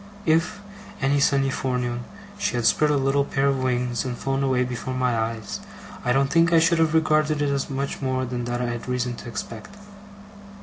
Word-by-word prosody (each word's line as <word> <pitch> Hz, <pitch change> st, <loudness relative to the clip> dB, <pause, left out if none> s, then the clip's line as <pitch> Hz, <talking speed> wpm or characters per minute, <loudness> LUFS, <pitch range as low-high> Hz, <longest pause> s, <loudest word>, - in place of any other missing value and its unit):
If, 170 Hz, +6 st, +1 dB, 0.4 s
any 140 Hz, +1 st, +2 dB
sunny 135 Hz, -1 st, +2 dB
forenoon, 125 Hz, -2 st, -2 dB, 0.3 s
she 200 Hz, -, -1 dB
had 120 Hz, -1 st, -1 dB
spread 150 Hz, +6 st, +4 dB
a 145 Hz, -, +3 dB
little 135 Hz, +1 st, +2 dB
pair 140 Hz, 0 st, -1 dB
of 135 Hz, -1 st, +1 dB
wings 125 Hz, -1 st, 0 dB
and 125 Hz, -2 st, -4 dB
flown 135 Hz, +2 st, -1 dB
away 130 Hz, -2 st, +2 dB
before 125 Hz, +1 st, -4 dB
my 125 Hz, -2 st, +1 dB
eyes, 110 Hz, -2 st, -3 dB, 0.4 s
I 125 Hz, -, +1 dB
don't 135 Hz, +2 st, +2 dB
think 165 Hz, 0 st, +4 dB
I 165 Hz, -, +6 dB
should 165 Hz, +1 st, +4 dB
have 160 Hz, -1 st, +2 dB
regarded 155 Hz, -1 st, +2 dB
it 145 Hz, -1 st, +1 dB
as 140 Hz, -1 st, -1 dB
much 140 Hz, +1 st, -3 dB
more 130 Hz, -1 st, 0 dB
than 120 Hz, -1 st, -4 dB
I -, -, -2 dB
had 120 Hz, -, -1 dB
had 120 Hz, +1 st, -5 dB
reason 125 Hz, -1 st, -1 dB
to -, -, -8 dB
expect. 115 Hz, -, -7 dB
135 Hz, 205 wpm, -24 LUFS, 125-145 Hz, 0.4 s, I